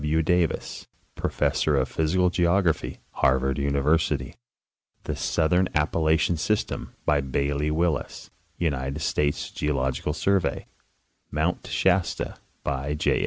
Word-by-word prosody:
M. 80 Hz, +2 st, +2 dB
Davis, 90 Hz, 0 st, 0 dB, 0.3 s
professor 75 Hz, -2 st, +1 dB
of 65 Hz, -, +1 dB
physical 90 Hz, +3 st, +1 dB
geography, 85 Hz, -2 st, +1 dB, 0.2 s
Harvard 65 Hz, +1 st, +3 dB
Univer 70 Hz, +3 st, +2 dB
sity; 70 Hz, -4 st, -2 dB, 0.7 s
The -, -, -3 dB
southern 90 Hz, +3 st, +1 dB
Appalachian 80 Hz, +2 st, +2 dB
system, 105 Hz, +7 st, -2 dB
by 75 Hz, -1 st, +3 dB
Bailey 70 Hz, +2 st, -1 dB
Willis, 80 Hz, 0 st, -1 dB, 0.3 s
United 70 Hz, -2 st, -2 dB
States 75 Hz, -2 st, 0 dB
Geological 70 Hz, 0 st, -1 dB
Survey; 95 Hz, +4 st, 0 dB, 0.6 s
Mount 80 Hz, +4 st, -1 dB
Shasta, 95 Hz, -1 st, +1 dB, 0.3 s
by 70 Hz, +2 st, -2 dB
J. 75 Hz, -, +1 dB
75 Hz, 110 wpm, -25 LUFS, 70-85 Hz, 0.7 s, Harvard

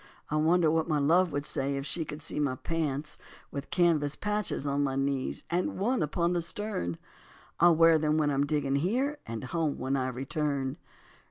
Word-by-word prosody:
I -, -, +1 dB
wonder 160 Hz, +1 st, +3 dB
what 160 Hz, 0 st, +1 dB
my 155 Hz, -2 st, +1 dB
love 165 Hz, +5 st, +3 dB
would 145 Hz, 0 st, -2 dB
say 140 Hz, -1 st, -1 dB
If 135 Hz, -, -4 dB
she 165 Hz, +1 st, -1 dB
could 150 Hz, 0 st, -7 dB
see 155 Hz, -, -3 dB
my 140 Hz, -3 st, +1 dB
pants 150 Hz, -2 st, -2 dB, 0.3 s
With 140 Hz, 0 st, -6 dB
canvas 155 Hz, -5 st, +2 dB
patches 210 Hz, -7 st, -1 dB
on 140 Hz, 0 st, +1 dB
my 135 Hz, -1 st, -1 dB
knees 135 Hz, -1 st, -1 dB
And 175 Hz, +1 st, 0 dB
one 240 Hz, +7 st, +1 dB
upon 170 Hz, +3 st, +1 dB
the 175 Hz, -, +1 dB
stern? 170 Hz, -, -3 dB, 0.6 s
I'll 170 Hz, -1 st, +6 dB
wear 165 Hz, 0 st, +6 dB
them 155 Hz, 0 st, +1 dB
when 150 Hz, -2 st, +2 dB
I'm 140 Hz, +1 st, +1 dB
digging 140 Hz, -2 st, 0 dB
here 255 Hz, -, 0 dB
And 115 Hz, +1 st, -5 dB
home 155 Hz, +2 st, -1 dB
when 130 Hz, +2 st, -1 dB
I 130 Hz, -1 st, 0 dB
return. 135 Hz, +1 st, -2 dB
150 Hz, 190 wpm, -29 LUFS, 140-170 Hz, 0.6 s, I'll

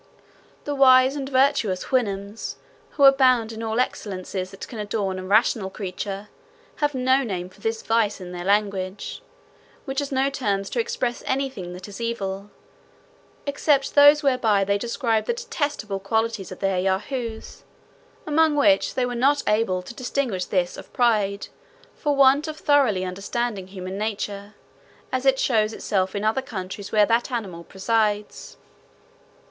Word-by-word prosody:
The 290 Hz, -, -3 dB
wise 260 Hz, -1 st, +6 dB
and 275 Hz, -2 st, -4 dB
virtuous 255 Hz, -8 st, +2 dB
Houyhnhnms, 205 Hz, -4 st, -2 dB, 0.4 s
who 285 Hz, -, +3 dB
abound 255 Hz, -4 st, +5 dB
in 225 Hz, 0 st, -7 dB
all 225 Hz, +1 st, -1 dB
excellences 185 Hz, -5 st, -3 dB
that 195 Hz, -, -9 dB
can 230 Hz, -, -8 dB
adorn 205 Hz, -3 st, -2 dB
a -, -, -6 dB
rational 205 Hz, 0 st, +2 dB
creature, 195 Hz, +1 st, -5 dB, 0.5 s
have 295 Hz, -2 st, 0 dB
no 260 Hz, +1 st, +3 dB
name 185 Hz, -7 st, -4 dB
for 195 Hz, +2 st, -21 dB
this 225 Hz, +1 st, -2 dB
vice 225 Hz, -3 st, +1 dB
in 180 Hz, -1 st, -8 dB
their 175 Hz, -1 st, -6 dB
language, 200 Hz, -1 st, -1 dB, 0.6 s
which 270 Hz, -2 st, -2 dB
has 285 Hz, -1 st, -3 dB
no 270 Hz, +1 st, +1 dB
terms 200 Hz, -7 st, -2 dB
to 245 Hz, -, -1 dB
express 240 Hz, +1 st, -2 dB
any 270 Hz, 0 st, 0 dB
thing 180 Hz, -7 st, -7 dB
that 185 Hz, +2 st, -9 dB
is 205 Hz, +2 st, -9 dB
evil, 200 Hz, -4 st, -3 dB, 1.0 s
except 285 Hz, -1 st, +1 dB
those 290 Hz, +1 st, +7 dB
whereby 230 Hz, -7 st, +3 dB
they 200 Hz, +1 st, 0 dB
describe 230 Hz, -1 st, 0 dB
the -, -, 0 dB
detestable 290 Hz, -, -3 dB
qualities 220 Hz, 0 st, -1 dB
of 185 Hz, -, -9 dB
their 195 Hz, -2 st, +1 dB
Yahoos, 220 Hz, +5 st, -3 dB, 0.6 s
among 310 Hz, 0 st, +3 dB
which 290 Hz, 0 st, +3 dB
they 255 Hz, -, +1 dB
were 245 Hz, -, -3 dB
not 275 Hz, +4 st, +2 dB
able 210 Hz, -4 st, +1 dB
to 235 Hz, -, -9 dB
distinguish 245 Hz, -7 st, -2 dB
this 180 Hz, -2 st, -1 dB
of -, -, -11 dB
pride, 210 Hz, -5 st, +1 dB, 0.5 s
for 295 Hz, -2 st, -1 dB
want 275 Hz, +3 st, +5 dB
of 310 Hz, 0 st, -5 dB
thoroughly 265 Hz, -13 st, +2 dB
understanding 200 Hz, +2 st, -3 dB
human 190 Hz, 0 st, -6 dB
nature, 205 Hz, -1 st, -4 dB, 0.6 s
as 260 Hz, +1 st, -1 dB
it 265 Hz, 0 st, +5 dB
shows 220 Hz, -4 st, +1 dB
itself 190 Hz, -3 st, -1 dB
in 200 Hz, -, -2 dB
other 220 Hz, +5 st, +1 dB
countries 200 Hz, -6 st, -7 dB
where 210 Hz, -1 st, +5 dB
that 230 Hz, +4 st, +1 dB
animal 190 Hz, -8 st, -4 dB
presides. 210 Hz, +2 st, -1 dB
220 Hz, 155 wpm, -24 LUFS, 195-260 Hz, 1.0 s, those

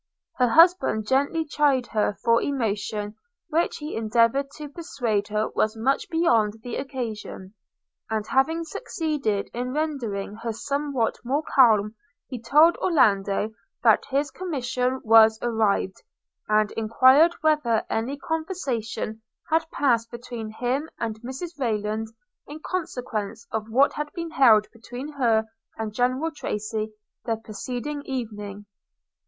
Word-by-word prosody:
Her 250 Hz, -, +4 dB
husband 325 Hz, -, +4 dB
gently 285 Hz, +5 st, +1 dB
chid 290 Hz, -4 st, +2 dB
her 210 Hz, -2 st, +1 dB
for 230 Hz, 0 st, +4 dB
emotion 210 Hz, -5 st, -2 dB, 0.4 s
which 330 Hz, +2 st, 0 dB
he 300 Hz, 0 st, -6 dB
endeavoured 230 Hz, +5 st, +2 dB
to 300 Hz, -1 st, -6 dB
persuade 245 Hz, -10 st, -2 dB
her 215 Hz, +1 st, -1 dB
was 215 Hz, +1 st, 0 dB
much 265 Hz, +5 st, 0 dB
beyond 225 Hz, -10 st, +2 dB
the 245 Hz, -, -5 dB
occasion; 225 Hz, -7 st, -6 dB, 0.6 s
and, 220 Hz, -1 st, -1 dB
having 320 Hz, +8 st, +1 dB
succeeded 295 Hz, -, -2 dB
in 250 Hz, +2 st, -3 dB
rendering 235 Hz, -10 st, -3 dB
her 230 Hz, 0 st, -4 dB
somewhat 275 Hz, +1 st, -1 dB
more 275 Hz, +5 st, 0 dB
calm, 220 Hz, -7 st, +4 dB, 0.3 s
he 250 Hz, -4 st, -7 dB
told 300 Hz, +8 st, +5 dB
Orlando 210 Hz, -, +2 dB, 0.3 s
that 225 Hz, -3 st, +5 dB
his 280 Hz, +1 st, 0 dB
commission 260 Hz, -5 st, -2 dB
was 220 Hz, -1 st, +6 dB
arrived, 220 Hz, -5 st, 0 dB, 0.5 s
and 215 Hz, 0 st, +3 dB
enquired 260 Hz, +9 st, +5 dB
whether 300 Hz, -8 st, +2 dB
any 245 Hz, +6 st, -2 dB
conversation 275 Hz, -, -3 dB, 0.3 s
had 320 Hz, 0 st, +2 dB
passed 235 Hz, -7 st, +1 dB
between 235 Hz, -2 st, -7 dB
him 255 Hz, +7 st, -2 dB
and 220 Hz, -1 st, -4 dB
Mrs 275 Hz, +6 st, -7 dB
Rayland 215 Hz, -2 st, -1 dB, 0.4 s
in 295 Hz, +2 st, -8 dB
consequence 235 Hz, -, -4 dB
of 220 Hz, 0 st, -3 dB
what 265 Hz, +5 st, +4 dB
had 295 Hz, 0 st, -4 dB
been 335 Hz, -1 st, -5 dB
held 230 Hz, -8 st, +6 dB
between 245 Hz, +5 st, -8 dB
her 235 Hz, -7 st, +1 dB, 0.3 s
and 220 Hz, -1 st, -4 dB
General 255 Hz, +7 st, 0 dB
Tracy 215 Hz, -6 st, -4 dB, 0.3 s
the 230 Hz, -, 0 dB
preceding 245 Hz, +7 st, -5 dB
evening? 210 Hz, -6 st, -5 dB
245 Hz, 125 wpm, -25 LUFS, 220-285 Hz, 0.6 s, was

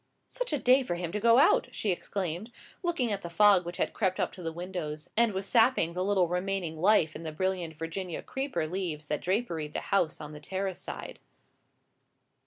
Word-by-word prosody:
"Such -, -, -3 dB
a 300 Hz, -, +1 dB
day 255 Hz, +1 st, +5 dB
for 245 Hz, -9 st, -2 dB
him 175 Hz, -1 st, -4 dB
to 210 Hz, -, -2 dB
go 230 Hz, +2 st, +5 dB
out!" 270 Hz, -, +5 dB
she 215 Hz, -4 st, -1 dB
exclaimed, 185 Hz, +3 st, -3 dB, 0.3 s
looking 335 Hz, -, 0 dB
at 200 Hz, -1 st, -2 dB
the 170 Hz, -, -6 dB
fog 190 Hz, 0 st, +5 dB
which 175 Hz, -, -5 dB
had -, -, -1 dB
crept 190 Hz, -4 st, 0 dB
up -, -, 0 dB
to 185 Hz, -, -11 dB
the 165 Hz, -1 st, -3 dB
windows, 170 Hz, -3 st, -5 dB
and 235 Hz, 0 st, +4 dB
was 190 Hz, 0 st, -3 dB
sapping 225 Hz, -6 st, +3 dB
the 180 Hz, +1 st, -1 dB
little 190 Hz, -2 st, +3 dB
remaining 180 Hz, -2 st, -2 dB
life 180 Hz, -4 st, +4 dB
in -, -, -6 dB
the 160 Hz, -1 st, -5 dB
brilliant 180 Hz, -1 st, -2 dB
Virginian 165 Hz, +3 st, -5 dB
creeper 265 Hz, -, -2 dB
leaves 160 Hz, -3 st, -4 dB
that 150 Hz, -, -1 dB
draperied 175 Hz, -6 st, -1 dB
the -, -, -1 dB
house 170 Hz, -5 st, +2 dB
on 150 Hz, 0 st, -8 dB
the 150 Hz, -, -8 dB
terrace 190 Hz, +4 st, -3 dB
side. -, -, -7 dB
185 Hz, 200 wpm, -29 LUFS, 165-210 Hz, 0.3 s, day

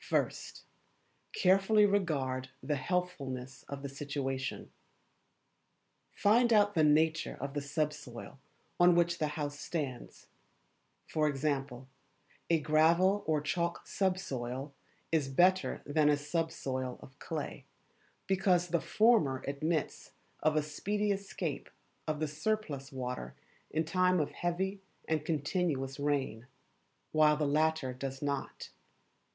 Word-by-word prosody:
First -, -, -2 dB, 0.7 s
Carefully 195 Hz, +3 st, +4 dB
regard 140 Hz, -10 st, 0 dB
the 150 Hz, -, 0 dB
Healthfulness 135 Hz, -5 st, -3 dB
of 140 Hz, 0 st, -6 dB
the -, -, -2 dB
Situation. 135 Hz, -1 st, -4 dB, 1.4 s
Find 235 Hz, +4 st, +4 dB
out 205 Hz, -2 st, +5 dB
the 160 Hz, -, +3 dB
nature 155 Hz, +1 st, +3 dB
of 140 Hz, +1 st, -4 dB
the 145 Hz, -, -2 dB
sub 150 Hz, +2 st, -1 dB
soil 120 Hz, +2 st, -10 dB, 0.4 s
on 175 Hz, 0 st, +6 dB
which 170 Hz, 0 st, +2 dB
the 155 Hz, -, +1 dB
house 145 Hz, -1 st, -3 dB
stands 145 Hz, -7 st, -5 dB, 0.8 s
for 155 Hz, -1 st, +1 dB
example, 135 Hz, -3 st, -2 dB, 0.6 s
a 165 Hz, -1 st, +4 dB
gravel 165 Hz, +6 st, +4 dB
or 155 Hz, -2 st, +2 dB
chalk 170 Hz, +3 st, -2 dB
subsoil 140 Hz, -8 st, -2 dB, 0.4 s
is 155 Hz, -4 st, +2 dB
better 180 Hz, +7 st, +2 dB
than 150 Hz, +1 st, +3 dB
a 145 Hz, -, +4 dB
subsoil 145 Hz, -4 st, -2 dB
of 130 Hz, +2 st, -15 dB
clay, 155 Hz, -3 st, -5 dB, 0.6 s
because 185 Hz, -2 st, +2 dB
the 170 Hz, -1 st, +1 dB
former 210 Hz, -, +3 dB
admits 155 Hz, +3 st, -2 dB, 0.3 s
of 155 Hz, 0 st, +2 dB
a 155 Hz, -, +2 dB
speedy 205 Hz, +8 st, -1 dB
escape 200 Hz, 0 st, -4 dB, 0.4 s
of 155 Hz, -1 st, -1 dB
the 155 Hz, -, 0 dB
surplus 150 Hz, -4 st, -2 dB
water 125 Hz, -, -5 dB, 0.3 s
in 160 Hz, +1 st, 0 dB
time 185 Hz, +2 st, +3 dB
of 150 Hz, -, -1 dB
heavy 190 Hz, +3 st, -2 dB, 0.3 s
and 155 Hz, -2 st, 0 dB
continuous 150 Hz, -3 st, -1 dB
rain, 135 Hz, -5 st, -1 dB, 0.6 s
while 155 Hz, -1 st, +5 dB
the 150 Hz, -, 0 dB
latter 150 Hz, -2 st, +1 dB
does 135 Hz, +2 st, -5 dB
not. 140 Hz, -1 st, -3 dB
155 Hz, 120 wpm, -32 LUFS, 140-175 Hz, 1.4 s, on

